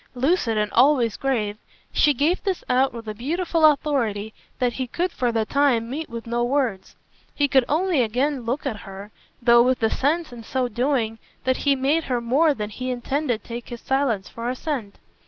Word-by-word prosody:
Lucid 255 -4 +1
and 210 0 0
always 250 -3 +4
grave, 220 -6 -1 0.4
she 300 - +4
gave 295 +7 +1
this 385 -3 -2
out 260 +2 +3
with 230 -2 -9
a 215 - -3
beautiful 325 - -1
authority 250 -9 +2 0.2
that 245 -1 0
he 260 +1 -3
could 350 +8 -2
for 245 -6 0
the 225 -1 0
time 250 -4 +1
meet 310 +4 -4
with 230 -1 -7
no 235 +1 -1
words. 240 -7 -1 0.4
He 290 - +2
could 265 -2 +3
only 330 -1 +2
again 255 +5 0
look 245 +6 -3
at 240 -6 -2
her, 195 +1 -10 0.3
though 235 0 +7
with 255 +1 +3
the 225 -1 +1
sense 305 0 0
in 235 -1 -9
so 255 +2 -1
doing 240 -2 -1 0.2
that 260 0 +1
he 280 -1 +2
made 285 +5 +1
her 250 -2 0
more 280 +6 +2
than 210 -2 -4
he 255 +4 -5
intended 250 -1 -2
take 235 0 -7
his 240 -2 -7
silence 265 -8 0
for 230 +1 -5
assent. 255 -5 -4
250 Hz, 190 wpm, -23 LUFS, 230-285 Hz, 0.4 s, though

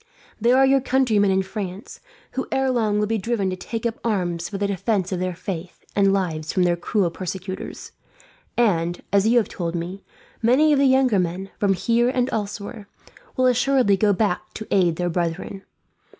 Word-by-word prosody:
There 240 +3 +4
are 270 - +6
your 270 0 +4
countrymen 245 -6 +2
in 190 0 +2
France, 190 0 -6 0.3
who 265 - -3
ere 265 0 +1
long 220 -4 +1
will 210 - +2
be 220 +1 -1
driven 200 -3 -1
to - - -2
take 220 +6 -5
up 230 -1 -2
arms, 175 -6 -1
for 200 - -4
the 200 - -1
defence 200 -1 -1
of 185 - -1
their 185 -1 -2
faith 180 -1 -7
and 195 -1 +4
lives 165 -6 -1
from 185 - +2
their 175 -1 +3
cruel 175 +1 0
persecutors; 185 +2 -6 0.7
and, 175 -7 +1
as 200 +1 +4
you 240 +2 +4
have 230 - +3
told 170 -1 -4
me, 175 +3 -5 0.4
many 270 +7 +4
of 280 - +3
the 275 - +5
younger 260 -5 +4
men, 185 +2 -3
from 200 -2 +3
here 235 +5 +2
and 255 0 0
elsewhere, 205 0 -4 0.5
will 255 - +3
assuredly 250 -3 +3
go 205 +2 +3
back 200 -2 -1
to 220 - -6
aid 175 -4 +3
their 175 +1 -1
brethren. 175 +3 -3
200 Hz, 190 wpm, -23 LUFS, 180-235 Hz, 0.7 s, are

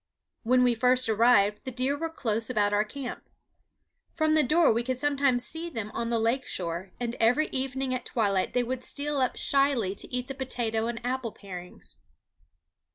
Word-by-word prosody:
When 250 +2 +3
we 245 -1 +4
first 250 +2 +2
arrived 215 -2 +3
the 265 - -5
deer 255 +3 0
were 330 +3 -3
close 225 -7 -1
about 205 -4 +1
our 205 +1 +3
camp. 250 +4 -7 0.9
From 315 -1 +2
the 310 - +5
door 305 +1 +4
we 230 - 0
could 255 +1 -2
sometimes 275 -3 +1
see 330 +1 -2
them 225 -8 -5
on 230 0 -2
the 235 - +1
lake 230 +4 +1
shore, 175 +1 -4
and 240 -1 -3
every 250 +7 +3
evening 265 0 -2
at 255 -1 -3
twilight 200 -5 0
they 245 - +2
would 255 +1 -4
steal 290 +2 -3
up 255 -2 +1
shyly 275 -8 +2
to - - -7
eat 250 0 -2
the 270 - -6
potato 235 -4 -1
and 235 0 -5
apple 250 -2 -2
parings. 180 -3 -9
245 Hz, 185 wpm, -27 LUFS, 225-270 Hz, 0.9 s, the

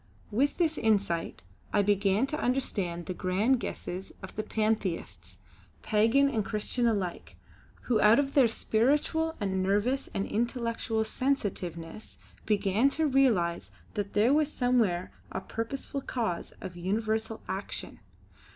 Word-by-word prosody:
With 270 +7 +1
this 325 -3 +1
insight 200 - 0 0.3
I 205 - +3
began 200 +3 +2
to 300 +2 -3
understand 195 - -1
the 185 - -3
grand 200 +9 +1
guesses 185 -4 -5
of 190 - -8
the 215 - -1
Pantheists, 215 -4 -2 0.5
pagan 225 +6 +4
and 225 -6 0
christian 225 +4 -1
alike, 195 -6 -2 0.5
who 235 -4 +1
out 215 +2 +7
of 275 -1 +1
their 270 -4 +6
spiritual 290 +9 +1
and 190 -3 0
nervous 210 +8 +1
and 195 - -1
intellectual 230 -1 -1
sensitiveness 205 - -3 0.3
began 210 +4 +3
to 320 - +2
realise 235 - +2 0.2
that 205 -1 -3
there 220 +6 +4
was 305 0 +2
somewhere 230 -10 +1 0.2
a - - -2
purposeful 270 +4 -4
cause 225 -10 -3
of 180 - -7
universal 220 +5 -1
action. 190 +2 -5
220 Hz, 130 wpm, -29 LUFS, 195-255 Hz, 0.5 s, out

